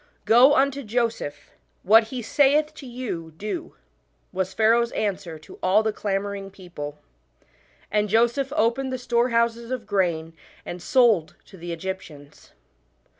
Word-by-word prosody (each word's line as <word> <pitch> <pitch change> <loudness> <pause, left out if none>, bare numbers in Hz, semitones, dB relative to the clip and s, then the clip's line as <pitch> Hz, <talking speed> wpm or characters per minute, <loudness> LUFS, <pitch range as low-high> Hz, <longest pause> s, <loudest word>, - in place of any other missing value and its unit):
" - - -42
Go 250 +6 +6
unto 275 +1 +2
Joseph; 230 - -3 0.3
what 220 +4 +6
he 245 +1 -6
saith 295 +5 +3
to 295 -3 -11
you, 215 -10 -6
do," 320 - -5 0.6
was 190 0 -2
Pharaoh's 230 +4 +3
answer 185 -6 -3
to 155 - -15
all 195 +4 +3
the 220 -1 -1
clamouring 200 -1 -3
people. 175 -6 -8 0.9
And 210 0 +1
Joseph 240 +5 +2
opened 260 -1 +1
the 255 - -2
storehouses 235 -1 0
of 255 -3 -4
grain 170 -5 -1 0.3
and 175 - -7
sold 225 - +3
to - - -15
the 175 -1 -7
Egyptians. 165 -4 -8
220 Hz, 135 wpm, -24 LUFS, 185-245 Hz, 0.9 s, Go